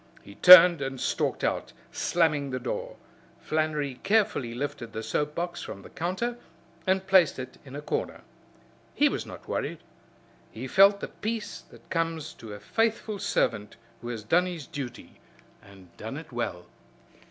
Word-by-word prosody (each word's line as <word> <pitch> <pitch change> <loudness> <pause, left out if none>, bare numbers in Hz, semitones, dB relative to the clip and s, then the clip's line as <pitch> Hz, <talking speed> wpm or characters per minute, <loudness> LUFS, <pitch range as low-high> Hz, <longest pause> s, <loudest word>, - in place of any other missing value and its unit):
He 100 - -12
turned 180 - +9
and 135 -1 -4
stalked - - -1
out, - - -1 0.2
slamming 150 -5 +1
the 130 -1 -3
door. 125 - -4 0.4
Flannery 150 -4 -2
carefully 195 - +1
lifted 120 -4 -5
the 110 - -4
soap 150 +5 -2
box 175 0 -3
from 100 - -8
the - - -13
counter 215 +8 -3 0.5
and 190 0 +2
placed 190 -5 +4
it 130 -1 -8
in 135 -1 -11
a 145 - -6
corner. - - -3 0.7
He - - +4
was - - -4
not - - -11
worried. - - -3 0.7
He 115 +4 -8
felt 195 +6 +5
the - - -3
peace 220 0 -5
that - - -17
comes 165 -2 -2
to 110 - -11
a - - -10
faithful 225 - -1
servant 105 - -1 0.3
who 120 - -7
has 115 -3 -5
done 175 +11 +3
his 170 -5 -6
duty 135 -7 -8 0.4
and 95 -3 -17
done 110 +6 -6
it 160 -1 -10
well. 105 -7 -4
150 Hz, 160 wpm, -27 LUFS, 120-180 Hz, 0.7 s, turned